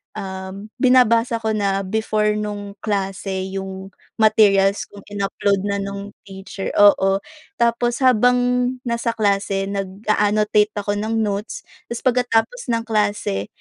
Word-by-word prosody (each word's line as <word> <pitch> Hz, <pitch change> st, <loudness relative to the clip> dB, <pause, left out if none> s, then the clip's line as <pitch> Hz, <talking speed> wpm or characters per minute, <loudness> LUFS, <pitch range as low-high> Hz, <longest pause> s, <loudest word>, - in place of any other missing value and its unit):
um, 190 Hz, 0 st, -7 dB
binabasa 245 Hz, -3 st, +4 dB
ko 220 Hz, -1 st, -1 dB
na 195 Hz, -1 st, 0 dB
before 215 Hz, 0 st, 0 dB
nung 205 Hz, -1 st, -5 dB
klase 195 Hz, -2 st, -2 dB
yung 190 Hz, 0 st, -6 dB, 0.3 s
materials 205 Hz, -2 st, +4 dB
kung 205 Hz, -, -12 dB
in-upload 200 Hz, -1 st, -1 dB
na 200 Hz, 0 st, -1 dB
nung 200 Hz, +1 st, -6 dB, 0.2 s
teacher 195 Hz, 0 st, -7 dB
oo. 195 Hz, -1 st, +5 dB, 0.4 s
Tapos 235 Hz, +1 st, +1 dB
habang 250 Hz, 0 st, +5 dB, 0.5 s
nasa 235 Hz, 0 st, -1 dB
klase 200 Hz, -2 st, 0 dB
nag-a-annotate 210 Hz, +2 st, +1 dB
ako 205 Hz, 0 st, -2 dB
ng 220 Hz, +2 st, -2 dB
notes 205 Hz, +1 st, -4 dB, 0.3 s
ta's 235 Hz, -, -3 dB
pagkatapos 250 Hz, -, +1 dB
ng 230 Hz, 0 st, 0 dB
klase, 205 Hz, -, -1 dB
205 Hz, 120 wpm, -20 LUFS, 195-220 Hz, 0.5 s, oo